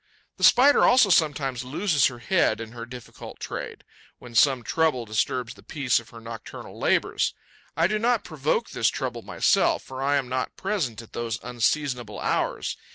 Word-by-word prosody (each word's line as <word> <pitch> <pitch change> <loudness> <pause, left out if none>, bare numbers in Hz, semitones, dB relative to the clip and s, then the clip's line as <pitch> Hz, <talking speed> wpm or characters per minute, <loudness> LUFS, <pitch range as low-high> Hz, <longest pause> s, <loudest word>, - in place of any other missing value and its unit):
The - - -7
Spider 275 +4 +6
also 245 -5 +5
sometimes 140 -7 +1
loses 145 +2 +2
her 125 - -6
head 120 - +1
in 115 -1 -7
her 115 0 -8
difficult 125 -1 -10
trade, - - -6 0.3
when 120 -1 -13
some 130 +1 +4
trouble 150 -4 0
disturbs 115 +3 -1
the - - -17
peace 135 -6 0
of 120 - -14
her 115 - -12
nocturnal 115 -1 -9
labours. - - +1 0.4
I 165 - +4
do 210 +4 +1
not 235 0 +1
provoke 155 -2 -1
this - - +2
trouble - - -4
myself, - - +2
for 130 0 -8
I 140 +1 +2
am 135 -3 0
not 130 0 -3
present 155 - -2
at 115 - -18
those 115 -2 -3
unseasonable 125 -2 -1
hours. - - -1
130 Hz, 170 wpm, -25 LUFS, 120-160 Hz, 0.4 s, Spider